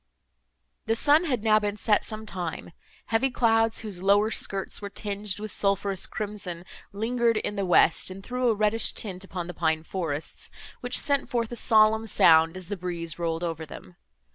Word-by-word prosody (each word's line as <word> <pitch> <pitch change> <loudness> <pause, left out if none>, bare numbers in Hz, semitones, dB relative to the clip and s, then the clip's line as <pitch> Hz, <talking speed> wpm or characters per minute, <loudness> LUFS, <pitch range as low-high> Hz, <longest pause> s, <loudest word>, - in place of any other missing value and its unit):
The 225 - +2
sun 295 +7 +3
had 250 -9 -1
now 215 -1 +4
been 205 0 -3
set 210 +1 +2
some 220 0 -7
time; 175 -5 -6 0.4
heavy 260 +4 +3
clouds, 225 -2 +2
whose 200 -5 -6
lower 205 +3 +3
skirts 195 -2 -2
were 200 - -5
tinged 205 -1 -2
with 215 -1 -6
sulphureous 195 -1 0
crimson, 200 -5 -5 0.3
lingered 230 +2 0
in 205 - -3
the 200 -2 -2
west, 175 -1 +4
and 190 +1 -9
threw 250 +1 -1
a 225 - +2
reddish 215 +2 +1
tint 190 -3 -3
upon 185 -2 -6
the 180 - -7
pine 160 -2 0
forests, 160 -4 -4 0.3
which 245 0 0
sent 280 -1 +1
forth 235 -2 -2
a - - -4
solemn 220 -1 +4
sound, 165 -3 +5
as 185 -2 -7
the 205 +1 -4
breeze 170 -2 -4
rolled 165 0 -2
over 165 -2 -3
them. 90 - -11
205 Hz, 180 wpm, -26 LUFS, 180-225 Hz, 0.4 s, sound